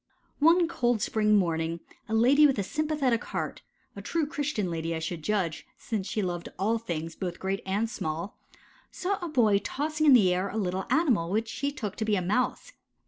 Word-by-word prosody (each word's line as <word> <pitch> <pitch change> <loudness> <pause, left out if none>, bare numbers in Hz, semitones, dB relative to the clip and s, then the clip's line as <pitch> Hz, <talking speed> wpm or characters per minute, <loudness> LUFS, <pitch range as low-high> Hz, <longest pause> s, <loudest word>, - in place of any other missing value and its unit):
One 335 +3 +5
cold 245 -8 +1
spring 210 +1 +2
morning 165 -3 0 0.3
a 220 - 0
lady 275 +7 +6
with 275 - 0
a 200 - 0
sympathetic 290 -1 0
heart - - -4 0.3
a - - -7
true 330 -2 -1
Christian 285 - -2
lady 165 0 -2
I - - -2
should 165 +1 -4
judge, 180 -4 -1
since 210 -4 -3
she 215 - -1
loved 175 -2 -3
all 220 +4 +1
things 165 -6 -4
"both 180 -2 -5
great 195 +1 -2
and 205 +4 0
small" 165 -3 -4 0.5
saw 390 +2 -2
a - - -2
boy 220 -9 +3
tossing 305 +8 -1
in 280 - +8
the 195 -7 +6
air 185 +2 -1
a 210 - -5
little 190 -2 -2
animal 240 - +2
which 220 +4 0
she 280 +5 -2
took 215 -9 -5
to 220 - -1
be 215 -1 +2
a 185 - 0
Mouse. 250 - -1
215 Hz, 195 wpm, -28 LUFS, 180-275 Hz, 0.5 s, in